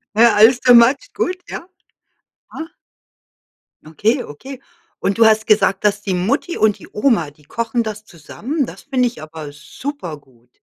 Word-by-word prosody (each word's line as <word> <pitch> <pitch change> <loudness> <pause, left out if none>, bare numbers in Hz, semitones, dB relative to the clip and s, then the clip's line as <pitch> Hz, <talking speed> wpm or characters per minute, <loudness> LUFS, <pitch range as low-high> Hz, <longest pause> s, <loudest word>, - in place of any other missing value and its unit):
Ja, 230 -1 +5
alles 230 +4 +6
too 250 -1 +5
much, 255 - +4
gut, 365 0 -2
ja. - - -7 0.9
Ja. 320 0 -6 1.2
Okay, 220 - 0
okay. 265 - -10 0.4
Und 200 +2 -1
du 230 - +7
hast 220 0 +4
gesagt, 210 -2 +2
dass 205 0 +2
die 190 -3 -2
Mutti 260 - -1
und 215 -2 +2
die - - -13
Oma, 210 - +1
die 150 +1 -24
kochen 230 - -2
das 215 -1 -6
zusammen, 245 - -4
das - - -11
finde 255 -3 +1
ich 155 - -8
aber 155 -2 -9
super 165 - -7
gut. 125 -3 -28
220 Hz, 165 wpm, -18 LUFS, 170-250 Hz, 1.2 s, du